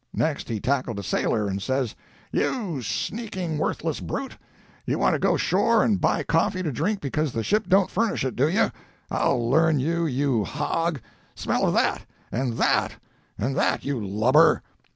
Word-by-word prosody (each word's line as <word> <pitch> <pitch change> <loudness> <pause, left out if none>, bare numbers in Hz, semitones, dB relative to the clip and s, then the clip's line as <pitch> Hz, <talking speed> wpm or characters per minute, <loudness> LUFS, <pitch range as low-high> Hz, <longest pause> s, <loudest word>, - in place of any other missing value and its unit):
Next 155 -5 -1
he 110 -2 -2
tackled 130 -2 -1
a 100 - -4
sailor, 105 +3 0
and 100 0 -3
says: 130 0 -1 0.4
"'You 185 - -1
sneaking 185 - -3
worthless 160 -1 -1
brute! 275 -1 -5 0.5
You - - -1
want - - +2
to - - 0
go - - +2
shore 230 -2 +3
and 205 -4 +1
buy - - +2
coffee 165 +3 +1
to 155 - -1
drink 190 - -1
because 150 0 -1
the 115 - -2
ship 215 - +1
don't 195 0 +4
furnish 220 - 0
it, 130 - -2
do 135 +4 +3
you! 180 - +2 0.4
I'll 120 -1 +1
learn 160 +3 +3
you, 165 +4 0
you 135 -5 +1
hog! 150 - -1 0.4
Smell - - 0
of - - +1
that!—and 125 0 -1
that!—and 115 - -2
that! - - +1
you 135 -6 -2
lubber! 115 +11 +4
145 Hz, 165 wpm, -25 LUFS, 125-170 Hz, 0.5 s, don't